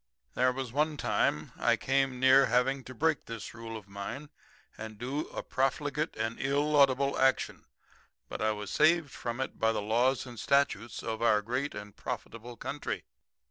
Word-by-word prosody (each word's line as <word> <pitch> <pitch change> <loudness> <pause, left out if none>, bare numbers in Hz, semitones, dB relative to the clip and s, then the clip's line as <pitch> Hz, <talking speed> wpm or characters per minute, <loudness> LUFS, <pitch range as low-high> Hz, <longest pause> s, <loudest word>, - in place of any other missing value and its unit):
"There 125 +1 +3
was 130 -2 -4
one 150 +1 +1
time 75 - 0
I - - +4
came 135 -1 0
near 130 +1 +6
having 130 +2 +2
to 130 - -9
break 160 +4 +1
this 115 -4 -6
rule 115 -1 -7
of 105 -2 -12
mine 100 +10 -6 0.4
and 110 -1 -8
do 135 +7 -3
a - - -6
profligate 145 +3 -1
and 115 +1 -3
illaudable 140 -1 +3
action, 130 0 +1 0.6
but - - -6
I 110 0 +2
was 105 -1 -5
saved 160 -2 +3
from 120 0 -5
it 130 - -4
by 110 - +3
the 115 - -1
laws 120 +6 +1
and 120 -3 -9
statutes 130 -5 +1
of 110 -1 -3
our 105 -3 +4
great 125 +6 -2
and 105 -1 -8
profitable 115 +1 -6
country. 145 0 -4
130 Hz, 170 wpm, -30 LUFS, 115-140 Hz, 0.6 s, near